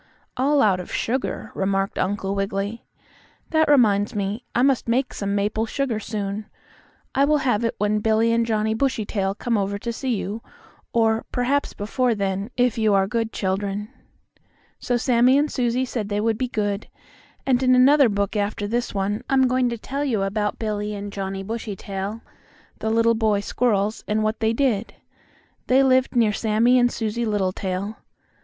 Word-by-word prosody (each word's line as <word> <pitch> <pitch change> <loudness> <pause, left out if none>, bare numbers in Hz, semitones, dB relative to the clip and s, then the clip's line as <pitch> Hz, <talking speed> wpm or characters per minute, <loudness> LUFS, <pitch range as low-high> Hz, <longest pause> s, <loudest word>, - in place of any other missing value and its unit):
"All 280 +3 +3
out 195 -4 +3
of 180 - -8
sugar," 255 +3 -2
remarked 195 0 -1
Uncle 195 +1 -1
Wiggily. 200 +2 -3 0.7
"That 315 -1 +3
reminds 215 -6 +3
me, 205 +3 -2
I 245 - +3
must 270 -3 +2
make 255 +3 +1
some 200 0 -2
maple 210 +2 0
sugar 255 -3 -1
soon. 205 0 -4 0.7
I 275 - +3
will 300 +2 +4
have 235 -3 +2
it 230 - -1
when 210 0 +1
Billie 220 +2 +2
and 230 0 +2
Johnnie 220 -1 0
Bushytail 215 -6 -1
come 230 -1 0
over 200 +1 -1
to 235 +3 -4
see 255 0 -1
you; 210 +2 -4 0.5
or, 225 -1 +2
perhaps 265 +3 0
before 235 +3 0
then, 195 +1 -2
if 245 -1 +2
you 215 -2 +3
are 195 -1 +3
good 225 +2 -2
children." 200 +2 -2 0.9
So 245 - 0
Sammie 250 +2 +4
and 295 +1 +1
Susie 250 0 0
said 225 -5 -4
they 205 0 -1
would 225 +1 +1
be 255 - 0
good, 205 -3 -2 0.6
and 255 -2 +2
in 255 -1 +4
another 270 +1 +6
book 200 0 -1
after 205 0 -1
this 235 0 -2
one, 200 +2 -1
I'm 265 -1 +4
going 255 0 +2
to 235 - -3
tell 275 +6 -4
you 230 -8 0
about 210 +1 -1
Billie 210 -1 -3
and 200 0 -6
Johnnie 195 0 -4
Bushytail, 205 -1 -5 0.6
the 220 - -2
little 230 +1 +3
boy 220 -2 +1
squirrels, 215 -1 0
and 215 +1 +1
what 215 +1 -1
they 220 0 +2
did. 230 -4 0 0.7
They 260 +2 +5
lived 260 -1 +3
near 225 -3 +3
Sammie 230 +4 +3
and 245 0 +3
Susie 225 +1 -2
Littletail. 195 0 -2
220 Hz, 170 wpm, -23 LUFS, 205-245 Hz, 0.9 s, another